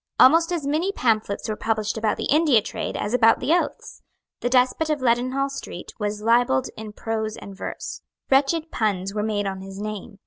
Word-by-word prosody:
Almost 330 +5 +6
as 335 -5 -2
many 315 +7 0
pamphlets 220 - 0
were 215 - -2
published 220 -1 -1
about 220 -1 0
the - - -3
India 300 -5 +5
trade - - -4
as 205 - -3
about 225 -2 +5
the 315 - +1
oaths. 350 - -2 0.4
The 245 - -1
despot 255 +5 +2
of 305 -1 +1
Leadenhall 255 +2 +1
Street 225 -9 -8
was 210 0 -3
libelled 230 - +3
in 215 -1 -7
prose 220 0 -3
and 200 -1 -10
verse. - - -6 0.3
Wretched 295 +4 +2
puns 195 -3 -1
were 210 - -1
made 210 -1 -1
on 190 -1 -3
his 195 0 -9
name. 210 0 -6
225 Hz, 185 wpm, -24 LUFS, 210-275 Hz, 0.4 s, Almost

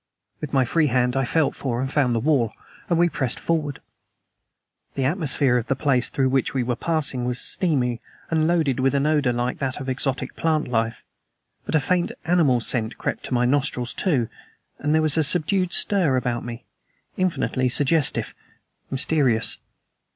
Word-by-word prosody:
With 150 - -6
my 135 -2 +2
free 155 +5 +1
hand 125 -1 +1
I 135 -1 +1
felt 160 +4 +1
for 120 -3 -3
and 135 +1 -3
found 130 -5 +2
the - - +1
wall, 125 -4 +1 0.4
and 170 - +2
we 175 +1 +4
pressed 135 -6 -2
forward. 150 -4 -2 1.1
The 135 - -1
atmosphere 140 -5 +2
of 120 - -3
the 135 - 0
place 130 -3 +2
through 135 -1 0
which 135 0 0
we 130 - +1
were 120 0 -1
passing 145 -4 +1
was 125 0 -2
steamy, 125 -9 0 0.3
and 160 -1 +2
loaded 160 -7 +1
with 135 +2 +1
an 140 +1 +1
odor 150 -4 +2
like 120 +1 -2
that 135 -1 -3
of 135 - -7
exotic 130 0 -2
plant 155 -2 0
life. 115 -2 -2 0.6
But - - -1
a - - +5
faint 175 +5 0
animal 160 -8 +3
scent 115 -1 -1
crept - - -4
to - - -4
my 120 0 +2
nostrils, 130 -2 0
too, 135 -11 0 0.5
and 150 +2 0
there 160 - +2
was 155 0 +2
a - - +3
subdued 180 +4 +2
stir 175 -11 +2
about 120 -2 -2
me, 120 0 -8 0.5
infinitely 165 -8 0
suggestive 145 +3 +2 0.6
mysterious. 135 -4 +1
135 Hz, 175 wpm, -23 LUFS, 125-155 Hz, 1.1 s, a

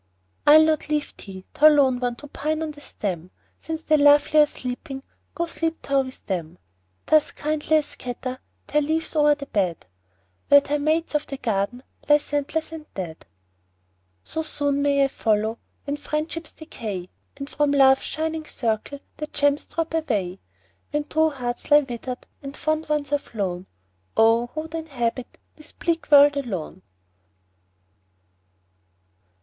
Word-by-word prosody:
I'll 310 +2 +9
not 310 -1 0
leave 300 -1 -1
thee, 190 -2 -10
thou 305 - +6
lone 275 -4 +4
one! 245 -1 -1
To 295 - -11
pine 310 +2 -2
on 310 - -3
the 290 -1 -14
stem; 180 - -5 0.3
Since 320 0 -5
the 310 -1 +3
lovely 290 +1 +6
are 300 - +7
sleeping, 270 +1 -6 0.3
Go 340 +3 0
sleep 330 -1 -2
thou 275 -1 +2
with 260 -1 -9
them. 175 -3 -4 0.5
Thus 310 -1 +4
kindly 310 +1 0
I - - +3
scatter 255 -2 -6 0.3
Thy 300 - +1
leaves 315 +2 -1
o'er 295 -1 +5
the 285 -1 -8
bed, 185 - -1 0.6
Where 285 0 +8
thy 290 +1 -2
mates 315 +3 0
of 300 - 0
the 275 - -5
garden 225 +1 -2 0.3
Lie 295 - +8
scentless 295 +2 -2
and 320 -1 -9
dead. 170 - -6 1.0
So 320 - -3
soon 285 -2 -1
may 280 -1 +3
I - - +4
follow, 220 -3 0 0.3
When 285 0 -2
friendships 305 +2 -4
decay, 210 - -6 0.3
And 275 0 -6
from 295 0 0
Love's 270 -1 +5
shining 315 0 -3
circle 235 +4 -2 0.2
The 305 - -4
gems 285 0 +1
drop 330 0 -3
away. 210 - -1 0.5
When 295 0 -1
true 315 +1 +2
hearts 245 -4 -5
lie 295 0 +7
wither'd, 250 -1 -6 0.2
And 275 0 -8
fond 310 0 -1
ones 295 -2 -1
are 290 - +2
flown, 190 -8 -4 0.5
Oh! 225 +2 +4
who 310 +5 -5
would 320 +1 -10
inhabit 255 -7 -3 0.2
This 305 -1 -11
bleak 335 -1 -2
world 290 -1 +7
alone 190 - -4
285 Hz, 155 wpm, -24 LUFS, 245-310 Hz, 1.0 s, I'll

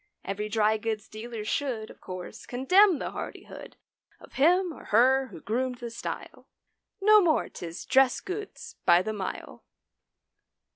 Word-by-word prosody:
Every 210 +2 -3
drygoods 215 0 0
dealer 220 0 -7
should 235 -3 -2
Of - - -18
course 185 +4 -8
condemn 360 +9 +4
the - - -4
hardihood - - -8 0.4
Of - - -16
him 350 +5 +3
or - - -13
her 260 +4 +4
who 175 -9 -12
groomed 250 +3 -2
the 235 -1 -7
style— 230 - -7 0.5
No 425 +1 +6
more 325 -4 +2
'tis 170 0 -8
dress 265 -1 +4
goods 420 +4 -7
by 175 +1 +5
the 215 +2 -3
mile. 195 -3 -6
240 Hz, 140 wpm, -27 LUFS, 215-305 Hz, 0.5 s, No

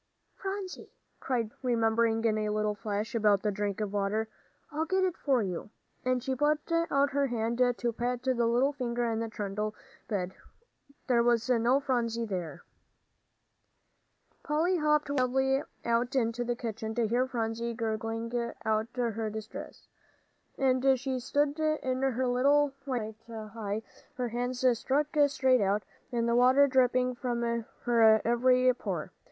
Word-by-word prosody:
"Phronsie," 385 -1 -6 0.2
cried 235 -4 -1
Polly, 250 -1 -2
remembering 225 0 +2
in 220 -1 +3
a 215 0 0
flash 210 +3 -3
about 210 -4 +3
the 210 - +1
drink 205 0 -2
of 210 -2 -3
water, 205 +2 0 0.4
"I'll 315 +1 -1
get 380 +2 +2
it 365 -2 0
for 265 -5 +1
you," 185 +1 -4 0.3
and 255 -1 0
she 265 - -1
put 295 +3 +2
out 285 -4 +2
her 280 +1 +1
hand 235 -1 -2 0.2
to 235 -1 -1
pat 245 +2 -2
the 260 0 +2
little 250 +5 +2
figure 245 -3 -2
in 225 - -1
the 225 0 -3
trundle 210 0 -3 0.3
bed. 190 -4 -2 0.7
There 245 -3 +3
was 235 -1 +2
no 245 +3 +3
Phronsie 235 -4 -1
there! 180 -6 -5 1.8
Polly 330 +5 +1
hopped 300 -2 +2
wildly 265 0 +2 0.2
out 235 +3 +1
into 240 -1 +1
the 240 0 -1
kitchen, 225 -2 -5
to 240 -2 +2
hear 245 +4 +1
Phronsie 235 -1 -2
gurgling 225 +1 -3 0.3
out 220 0 +1
her 225 -3 -1
distress, 215 0 -8 0.7
as 265 0 +3
she 260 0 -2
stood 285 +4 0
in 290 -5 0
her 260 -1 +1
little 275 +3 +3
white 220 -5 -3
nightie, 220 -1 -5 0.3
her 250 -1 -2
hands 245 +2 -2
stuck 295 +3 0
straight 260 -4 +3
out, 200 +1 +1 0.3
and 235 -1 0
the 235 - +2
water 255 +3 +6
dripping 255 -1 +2
from 240 -1 -2 0.4
her 225 -2 +5
every 255 +2 +4
pore. - - -4
240 Hz, 145 wpm, -30 LUFS, 220-265 Hz, 1.8 s, water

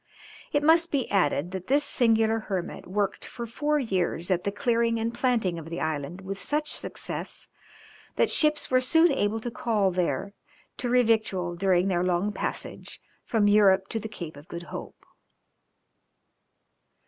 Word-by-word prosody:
It 290 - +1
must 330 +2 +5
be 275 -5 0
added 175 -3 +1
that 185 -1 -6
this 285 +3 +3
singular 225 -4 +3
hermit 190 -5 -5
worked 195 +1 -1
for 235 - -6
four 295 +6 0
years 185 - -1
at 180 -1 0
the 200 - 0
clearing 230 +2 +1
and 230 +1 -2
planting 235 -8 0
of 160 0 -9
the 170 - -4
island 155 +3 -3
with 195 +1 -6
such 300 0 -1
success, - - -4 0.7
that - - +2
ships 300 -3 +2
were 255 0 +4
soon 325 +6 +4
able 225 -4 0
to 240 - -4
call 215 -5 +1
there 180 +1 -1 0.4
to 245 - -2
revictual 220 -7 +2
during 185 0 +2
their 175 -2 +1
long 180 +3 0
passage - - -5 0.3
from 215 -3 +2
Europe 195 -2 +4
to 225 - -2
the 220 - -6
Cape 165 -8 -8
of 145 +3 -13
Good 170 0 -7
Hope. - - -8
205 Hz, 160 wpm, -27 LUFS, 180-240 Hz, 0.7 s, must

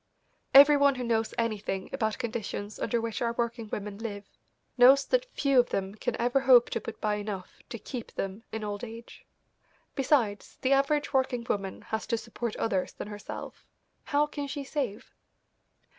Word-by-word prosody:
Every 285 +1 +10
one 280 -1 +4
who 250 - -4
knows 225 -2 0
anything 210 -4 -2
about 220 -1 -1
conditions 220 -2 -4
under 235 - 0
which 230 -1 -3
our 235 -1 0
working 235 -1 -3
women 205 0 -5
live 205 -3 -5 0.5
knows 265 +2 +7
that - - 0
few 275 -3 +3
of 245 - +3
them 195 0 -2
can 230 +3 -3
ever 245 +3 +2
hope 255 -3 +6
to 230 - -1
put - - -7
by 210 -1 0
enough 205 -3 -6
to 230 - -5
keep 240 +1 -7
them 195 +2 -4
in 220 -1 -4
old 205 0 -4
age. 230 0 -10 0.7
Besides, 250 -7 0
the 265 +1 +4
average 285 +2 +1
working 260 -3 +1
woman 195 -2 -3
has 220 0 -4
to 230 - +1
support 230 0 -5
others 190 -5 -1
than - - -7
herself. 205 -1 -8 0.4
How 290 0 +2
can 290 -1 -5
she 280 +1 -4
save? 265 -7 -4
235 Hz, 175 wpm, -29 LUFS, 210-265 Hz, 0.7 s, Every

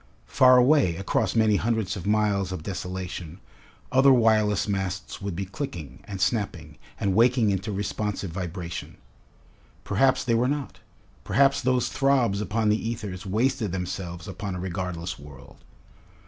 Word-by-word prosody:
Far 130 - +6
away, 125 - +4
across 95 +5 -1
many 110 -2 +4
hundreds 110 -3 -1
of 95 -1 -6
miles 105 -3 +1
of 90 -4 -5
desolation, 90 -2 -5 0.5
other 135 +1 +6
wireless 110 -5 +3
masts 95 -2 -3
would 100 -3 -4
be 95 +3 -3
clicking, 90 - -6
and 100 -2 -6
snapping, 100 +2 -2 0.2
and 100 -2 0
waking 115 0 +4
into 95 +2 -2
responsive 100 -1 -3
vibration. 90 0 -6 0.9
Perhaps 130 +6 +2
they 120 - 0
were 120 +2 +2
not. 145 -1 -3 0.4
Perhaps 140 0 +3
those 130 -1 +1
throbs 130 -7 +2
upon 105 +1 0
the 110 +2 0
ethers 105 -4 -6
wasted 115 +1 0
themselves 90 -1 -5
upon 95 0 -5
a - - -5
regardless 90 -2 -4
world. 70 -2 -13
100 Hz, 140 wpm, -26 LUFS, 90-115 Hz, 0.9 s, Far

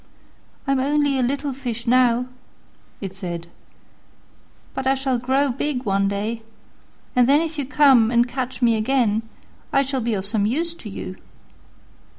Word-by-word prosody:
"I'm 275 -1 +1
only 285 0 +1
a - - +2
little 275 +3 -1
fish 240 -3 -5
now," 245 0 +3 0.8
it 195 -2 -5
said, 175 -3 -5 1.3
"but 265 0 -3
I 270 - +4
shall 265 -2 0
grow 265 +3 +1
big 265 0 -2
one 195 0 +1
day, 210 +3 -2 0.7
and 250 0 +4
then 285 +2 +6
if 320 -1 -3
you 280 - -1
come 270 -6 +5
and 240 0 +3
catch 255 0 -4
me 230 -2 +4
again 225 -2 +1 0.5
I 275 - +3
shall 265 -1 -2
be 230 -1 0
of 190 -1 -3
some 205 0 +2
use 330 +8 -1
to 235 -10 -10
you." 190 -1 -7
250 Hz, 160 wpm, -22 LUFS, 220-275 Hz, 1.3 s, then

